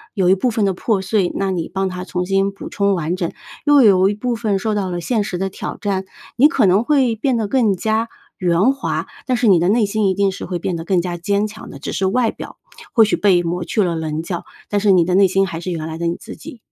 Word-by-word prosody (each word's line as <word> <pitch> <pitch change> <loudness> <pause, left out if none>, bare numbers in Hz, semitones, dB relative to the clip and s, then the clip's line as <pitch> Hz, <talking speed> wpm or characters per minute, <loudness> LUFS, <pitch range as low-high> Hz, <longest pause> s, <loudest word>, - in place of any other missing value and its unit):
有 190 -4 +1
一 185 - +6
部 245 +6 0
分 220 -2 0
的 195 - +1
破 200 +2 -1
碎， 190 -1 +1
那 195 -1 -1
你 170 -3 -3
帮 195 0 -1
它 180 0 -5
重 180 -1 -3
新 195 +1 +1
补 195 - -9
充 200 -1 +1
完 170 0 -2
整； 175 -2 -2 0.4
又 290 -1 +6
有 195 -3 +5
一 205 - -2
部 240 +3 -2
分 215 -3 0
受 215 +2 -1
到 200 -3 -1
了 175 -1 -3
现 215 +4 0
实 180 - -4
的 195 +1 -2
挑 - - -6
战， 195 -2 -2 0.3
你 285 +5 +7
可 305 - +2
能 195 +4 +4
会 260 -4 +2
变 245 +2 0
得 215 -2 -1
更 225 -5 +2
加 220 +4 -1 0.3
圆 180 +6 +3
滑， 275 - -3 0.2
但 255 -2 +1
是 240 - +1
你 185 -4 +6
的 175 - +1
内 220 +1 +3
心 210 0 0
一 190 - +1
定 200 0 +2
是 190 - -7
会 180 - -3
变 175 +1 -3
得 165 - -5
更 180 +1 +1
加 175 0 -3
坚 200 +4 0
强 215 +1 -9
的。 - - -9
只 140 - -6
是 190 - 0
外 230 +3 +1
表 - - -10 0.4
或 230 - +6
许 215 - +2
被 185 -4 +3
抹 175 +1 -2
去 205 +4 0
了 175 -2 -1
棱 160 0 -3
角， 175 0 -4 0.3
但 205 -1 0
是 205 -1 +4
你 180 -3 +4
的 180 - -1
内 195 0 +6
心 195 +1 +2
还 165 -1 -5
是 180 +1 -4
原 160 -2 -4
来 160 0 -6
的 170 - -1
你 170 - -1
自 225 - -10
己。 250 - -11
195 Hz, 300 characters per minute, -19 LUFS, 180-215 Hz, 0.4 s, 你